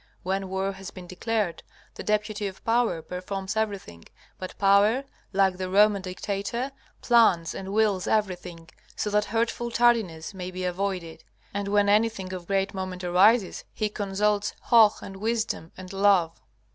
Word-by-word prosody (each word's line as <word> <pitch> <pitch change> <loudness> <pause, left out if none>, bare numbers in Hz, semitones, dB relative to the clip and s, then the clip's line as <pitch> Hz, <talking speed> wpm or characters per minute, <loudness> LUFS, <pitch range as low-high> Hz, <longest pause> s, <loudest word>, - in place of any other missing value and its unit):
When 190 +1 -2
war 190 +1 -1
has 195 0 -9
been 185 -2 -11
declared, 190 -1 -2 0.3
the - - -8
deputy 210 -1 -1
of 190 -1 -10
Power 225 -8 +1
performs 190 +3 -5
everything, 200 - -3 0.3
but 185 - -7
Power, 205 +6 +4 0.3
like 190 -2 +2
the 185 0 -4
Roman 205 +1 +4
dictator, 200 +7 -3 0.3
plans 220 -9 +4
and 195 0 -6
wills 205 -3 +1
everything, 180 -5 -2 0.3
so 210 - -2
that 210 0 +2
hurtful 230 +2 -1
tardiness 225 -9 +1
may 185 -1 -6
be 185 0 -6
avoided. 180 -3 -3 0.3
And 200 0 -3
when 205 0 +3
anything 205 -3 +1
of 180 -2 -7
great 195 0 0
moment 185 -1 -5
arises 190 +4 +3
he 215 -1 -1
consults 205 +1 -1 0.2
Hoh 220 -3 +7
and 195 -1 -8
Wisdom 220 -5 -2
and 185 0 -9
Love. 195 -4 +2
195 Hz, 150 wpm, -26 LUFS, 185-210 Hz, 0.3 s, Hoh